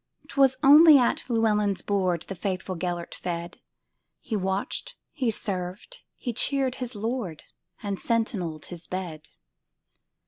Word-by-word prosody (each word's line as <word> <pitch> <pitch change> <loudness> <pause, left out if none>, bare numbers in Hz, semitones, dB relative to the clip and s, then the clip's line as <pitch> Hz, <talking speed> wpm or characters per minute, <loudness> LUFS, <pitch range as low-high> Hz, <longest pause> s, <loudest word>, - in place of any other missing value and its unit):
'T - - -10
was 265 -1 +5
only 300 +2 +9
at 250 0 +1
Llewelyn's 210 -4 +1
boardThe 190 -2 -1
faithful 185 0 -3
Gêlert 175 0 -3
fed; 170 0 -5 0.6
He 220 - -4
watched, 190 0 -2 0.2
he 260 -6 -1
served, 200 - -3
he 245 - -4
cheered 265 +1 +1
his 250 -1 -4
lord, 210 -6 -3 0.4
And 200 -2 -3
sentineled 200 - -1
his 170 -2 -8
bed. 165 -5 -5
200 Hz, 125 wpm, -26 LUFS, 180-240 Hz, 0.6 s, only